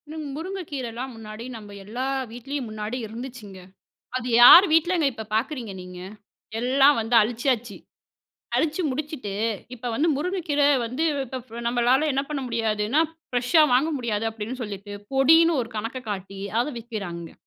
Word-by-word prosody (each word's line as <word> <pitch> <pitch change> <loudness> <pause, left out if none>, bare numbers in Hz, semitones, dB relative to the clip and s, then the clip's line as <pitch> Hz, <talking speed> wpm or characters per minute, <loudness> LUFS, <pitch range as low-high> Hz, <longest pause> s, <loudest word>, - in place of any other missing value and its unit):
இன் 310 -1 -5
முருங்கைக்கீரைலாம் 275 -9 -5
முன்னாடி 220 +1 -9
நம்ம 205 -2 -10
எல்லா 245 +6 -4 0.2
வீட்லயும் 255 +1 -5
முன்னாடி 215 +3 -4
இருந்துச்சுங்க, 225 -4 -9 0.6
அது 250 0 -5
யார் 355 +10 +11
வீட்லங்க 330 -1 +3
இப்போ 220 -1 -7
பாக்குறீங்க 235 -3 -2
நீங்க? 180 0 -10 0.6
எல்லாம் 270 +2 +4
வந்து 225 +2 -2
அழிச்சிசாச்சு. 240 +2 0 0.8
அழிச்சு 320 +3 0
முடிச்சுட்டு, 265 -7 -4 0.4
இப்ப 245 +1 -8
வந்து 315 +7 +2
முருங்கைக்கீரை 305 -4 +1 0.2
வந்து 260 +8 -2 0.2
இப்போ 260 +2 -5
ஃப் 225 - -21
நம்மளால 250 +5 +3
என்ன 275 +1 0
பண்ண 280 -3 -2
முடியாதுன்னா, 225 +5 +1 0.3
ஃப்ரெஷ்ஷா 250 +6 +4
வாங்க 280 +6 +3
முடியாது 225 -2 -1
அப்படின்னு 225 +4 -6
சொல்லிட்டு 205 -1 -7 0.2
பொடின்னு 325 +3 +5
ஒரு 230 - -9
கணக்க 230 +4 -4
காட்டி 195 0 -6 0.2
அதை 290 +4 -1
விற்கிறாங்கங்க. 195 -8 -6
245 Hz, 135 wpm, -24 LUFS, 220-290 Hz, 0.8 s, யார்